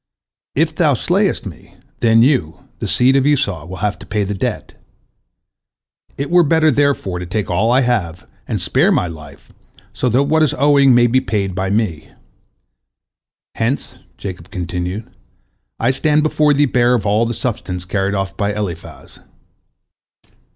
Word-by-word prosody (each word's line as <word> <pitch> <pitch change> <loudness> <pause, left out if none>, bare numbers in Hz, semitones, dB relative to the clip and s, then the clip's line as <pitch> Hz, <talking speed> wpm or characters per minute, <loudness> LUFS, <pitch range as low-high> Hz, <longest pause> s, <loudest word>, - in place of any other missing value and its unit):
If 160 +2 +1
thou 155 -4 +2
slayest 190 - 0
me, 85 -7 -11 0.2
then 115 -1 +4
you, 120 - 0
the - - -3
seed 130 +2 +3
of 135 0 +3
Esau, 100 - 0
will 95 - -7
have 105 - -2
to - - -11
pay 105 -1 -1
the 100 +1 -3
debt. 95 - -4 1.4
It 140 +4 -4
were 175 0 +6
better, 160 0 +3
therefore, 140 -10 0
to 90 - -6
take 105 +2 -3
all 110 +3 +1
I 130 +2 +4
have, 100 -9 -1 0.2
and - - -2
spare - - +2
my - - +2
life, 80 -4 -11 0.4
so 125 +4 -1
that 125 +4 +3
what 155 +3 +1
is 155 - +2
owing 140 -2 +4
may 120 0 +5
be 130 +2 +2
paid 100 -6 -2
by 95 +1 -2
me. 100 -7 -2 1.4
Hence," 120 +5 -2 0.2
Jacob 90 -3 -8
continued, 90 +2 -4 0.7
"I 120 +3 +2
stand 150 +3 +1
before 150 -1 +2
thee 145 +1 +3
bare 125 -2 +2
of 110 - -2
all 105 +3 +2
the 120 - -3
substance 100 -7 -4
carried 100 +1 -1
off 95 0 -3
by 100 +1 -2
Eliphaz." 90 -6 -7
115 Hz, 160 wpm, -17 LUFS, 95-140 Hz, 1.4 s, were